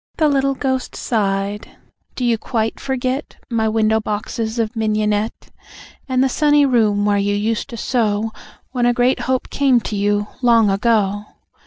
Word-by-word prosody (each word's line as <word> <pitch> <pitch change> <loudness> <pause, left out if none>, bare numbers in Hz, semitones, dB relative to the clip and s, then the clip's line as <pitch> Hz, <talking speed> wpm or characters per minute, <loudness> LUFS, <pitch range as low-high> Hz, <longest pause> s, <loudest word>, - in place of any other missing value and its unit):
The 310 - +3
little 275 -1 +1
ghost 260 -1 -2
sighed: 200 -2 -2 0.4
"Do 250 - -2
you 230 -2 +2
quite 225 -1 -2
forget 265 +1 -3 0.2
My 220 -1 +1
window 220 0 +2
boxes 220 +2 -3
of 225 0 -1
mignonette? 215 0 -1 0.6
And 255 0 +2
the - - +3
sunny 290 +2 +3
room 215 -6 +2
where 205 -1 +2
you 205 0 0
used 220 +5 -1
to 235 - -7
sew 220 -2 0 0.4
When 245 -2 +1
a 245 - +3
great 245 +2 +2
hope 260 -1 -1
came 270 -3 +3
to 215 - -4
you, 205 +1 +1 0.2
long 230 -4 +4
ago? 205 -1 +1
225 Hz, 160 wpm, -19 LUFS, 210-255 Hz, 0.6 s, long